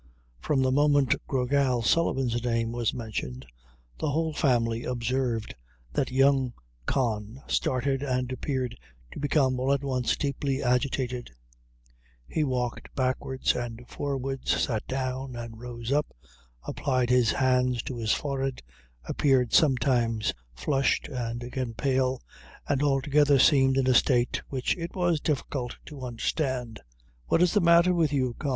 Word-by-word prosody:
From 135 Hz, -, +1 dB
the 130 Hz, -, +2 dB
moment 145 Hz, -1 st, +4 dB
Gra 130 Hz, -2 st, 0 dB
Gal 130 Hz, -3 st, +2 dB
Sullivan's 125 Hz, -3 st, +1 dB
name 115 Hz, -1 st, 0 dB
was 120 Hz, -2 st, 0 dB
mentioned, 85 Hz, -, -5 dB, 0.5 s
the 155 Hz, -, 0 dB
whole 160 Hz, +2 st, 0 dB
family 120 Hz, -5 st, +1 dB
observed 120 Hz, -2 st, -1 dB, 0.4 s
that 130 Hz, -, 0 dB
young 135 Hz, -1 st, +3 dB, 0.3 s
Con 115 Hz, -2 st, -1 dB
started 135 Hz, +1 st, 0 dB
and 130 Hz, -2 st, -1 dB
appeared 130 Hz, -1 st, -2 dB, 0.4 s
to -, -, -8 dB
become 135 Hz, -3 st, +2 dB
all 130 Hz, +2 st, +1 dB
at 140 Hz, 0 st, +1 dB
once 130 Hz, -3 st, 0 dB
deeply 140 Hz, -1 st, -1 dB
agitated; 125 Hz, -1 st, 0 dB, 1.0 s
he 155 Hz, -, 0 dB
walked 125 Hz, -3 st, -2 dB
backwards 130 Hz, 0 st, 0 dB
and 120 Hz, 0 st, -5 dB
forwards 135 Hz, -2 st, -2 dB
sat 110 Hz, -4 st, -1 dB
down 130 Hz, 0 st, -3 dB
and 115 Hz, -1 st, -7 dB
rose 120 Hz, 0 st, -6 dB
up 150 Hz, +1 st, +2 dB, 0.6 s
applied 130 Hz, -3 st, 0 dB
his 125 Hz, -3 st, +4 dB
hands 125 Hz, -2 st, +2 dB
to 130 Hz, -, -5 dB
his 110 Hz, -2 st, 0 dB
forehead 135 Hz, -2 st, -2 dB, 0.4 s
appeared 130 Hz, -4 st, +1 dB
sometimes 120 Hz, -6 st, +3 dB, 0.2 s
flushed, 135 Hz, -, 0 dB
and 120 Hz, -3 st, -4 dB
again 125 Hz, -1 st, -4 dB
pale 130 Hz, 0 st, 0 dB, 0.4 s
and 140 Hz, -1 st, +1 dB
altogether 145 Hz, 0 st, +3 dB
seemed 135 Hz, -1 st, +5 dB
in 135 Hz, -, +2 dB
a 130 Hz, -, +4 dB
state 125 Hz, 0 st, +3 dB
which 130 Hz, -2 st, -1 dB
it 170 Hz, 0 st, -6 dB
was 175 Hz, -4 st, +1 dB
difficult 135 Hz, -4 st, -2 dB
to 145 Hz, -3 st, -10 dB
understand. 125 Hz, -1 st, -2 dB, 0.5 s
"What 170 Hz, -, +3 dB
is 180 Hz, -, +2 dB
the 205 Hz, -, +3 dB
matter 170 Hz, +1 st, +5 dB
with 165 Hz, -4 st, +2 dB
you, 130 Hz, -4 st, 0 dB
Con?" 145 Hz, -, -2 dB
130 Hz, 140 wpm, -27 LUFS, 120-140 Hz, 1.0 s, seemed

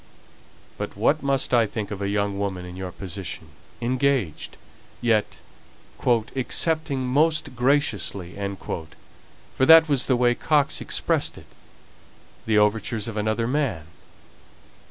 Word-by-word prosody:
But -, -, -5 dB
what 140 Hz, +9 st, +2 dB
must 135 Hz, -2 st, 0 dB
I 115 Hz, -2 st, +4 dB
think 105 Hz, 0 st, -5 dB
of 100 Hz, -1 st, -5 dB
a 100 Hz, -, -1 dB
young 100 Hz, -1 st, -1 dB
woman 95 Hz, -3 st, -3 dB
in 90 Hz, 0 st, -9 dB
your 95 Hz, -1 st, -6 dB
position, 90 Hz, -3 st, -7 dB, 0.3 s
engaged 125 Hz, -, -1 dB, 0.4 s
yet 110 Hz, -3 st, +1 dB, 0.7 s
'accepting 130 Hz, +4 st, +1 dB
most 150 Hz, +1 st, +1 dB
graciously,' 115 Hz, -, 0 dB, 0.2 s
for 85 Hz, +10 st, -6 dB
that 160 Hz, 0 st, +9 dB
was 140 Hz, -4 st, +1 dB
the 130 Hz, -, +3 dB
way 120 Hz, 0 st, +3 dB
Coxe 145 Hz, +2 st, +1 dB
expressed -, -, 0 dB
it -, -, -13 dB, 1.0 s
the 110 Hz, -1 st, +3 dB
overtures 105 Hz, +1 st, +1 dB
of 115 Hz, -, -5 dB
another 110 Hz, +2 st, 0 dB
man? 125 Hz, -, -1 dB
115 Hz, 120 wpm, -24 LUFS, 100-135 Hz, 1.0 s, that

